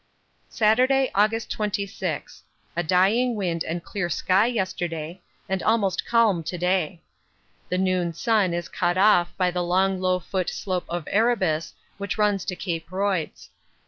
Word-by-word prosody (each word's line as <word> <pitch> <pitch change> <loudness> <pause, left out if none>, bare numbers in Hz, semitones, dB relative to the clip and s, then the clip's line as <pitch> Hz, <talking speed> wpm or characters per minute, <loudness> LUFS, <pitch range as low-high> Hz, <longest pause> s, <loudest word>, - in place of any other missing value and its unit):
Saturday, 255 +5 +3
August 215 +2 +1
26. 205 -1 -3 0.3
A 175 - +1
dying 200 +9 +3
wind 175 -5 -1
and 170 +1 -4
clear 195 -4 -3
sky 190 +6 +2
yesterday, 175 -6 -3 0.3
and 190 0 -1
almost 200 -4 +1
calm 225 -7 +3
to 165 +3 -5
day. 180 -1 -1 0.7
The 180 - 0
noon 185 -2 +1
sun 215 -3 +2
is 170 0 -3
cut 175 0 -1
off 185 -3 +4
by 180 -1 +2
the 180 0 -2
long 185 +2 +1
low 185 0 +2
foot 185 0 -2
slope 185 -3 -3
of 175 -1 -3
Erebus 195 -8 +1 0.2
which 200 +1 -3
runs 205 -3 +1
to 185 - -3
Cape 170 -3 -4
Royds. 190 -4 -2
185 Hz, 145 wpm, -24 LUFS, 175-210 Hz, 0.7 s, off